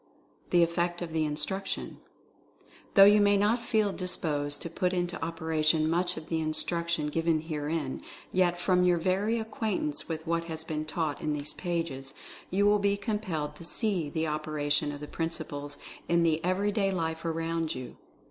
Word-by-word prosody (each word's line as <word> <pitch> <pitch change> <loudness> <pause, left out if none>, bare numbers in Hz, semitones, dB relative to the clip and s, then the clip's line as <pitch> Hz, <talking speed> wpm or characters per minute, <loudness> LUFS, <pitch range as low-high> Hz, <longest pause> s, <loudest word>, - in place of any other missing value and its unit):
THE 175 -1 +5
EFFECT 175 +1 0
OF 165 -2 -6
THE 160 -1 +1
INSTRUCTION. 155 +7 -2 1.0
Though 195 - +10
you 205 +1 +7
may 205 0 +5
not 210 +4 +3
feel 220 -3 +1
disposed 150 -5 -1
to 170 - -4
put 180 +2 0
into 175 0 -1
oper 160 0 -3
ation 155 0 +3
much 175 +2 +1
of 160 0 -7
the 165 -1 0
instruction 170 +1 0
given 165 0 +1
herein, 150 -3 -3 0.3
yet, 175 -1 +2
from 180 0 +3
your 180 -1 +4
very 195 +6 +1
acquaintance 215 -9 -2
with 160 -1 -4
what 170 0 0
has 160 -1 -6
been 155 -1 -3
taught 155 -2 -2
in 150 - 0
these 150 0 -1
pages, 165 -7 -3 0.3
you 200 +2 +2
will 205 0 +5
be 200 0 +2
compelled 190 -8 -2
to - - -10
see 180 -3 0
the 160 +2 -1
opera 150 -1 -2
tion 145 0 +3
of 145 0 -7
the 150 - -6
principles 145 -3 -4 0.3
in 170 0 +4
the 160 -1 +2
everyday 195 +2 +1
life 165 -3 -2
around 165 -1 -1
you. 130 -1 -7
165 Hz, 175 wpm, -29 LUFS, 155-185 Hz, 1.0 s, Though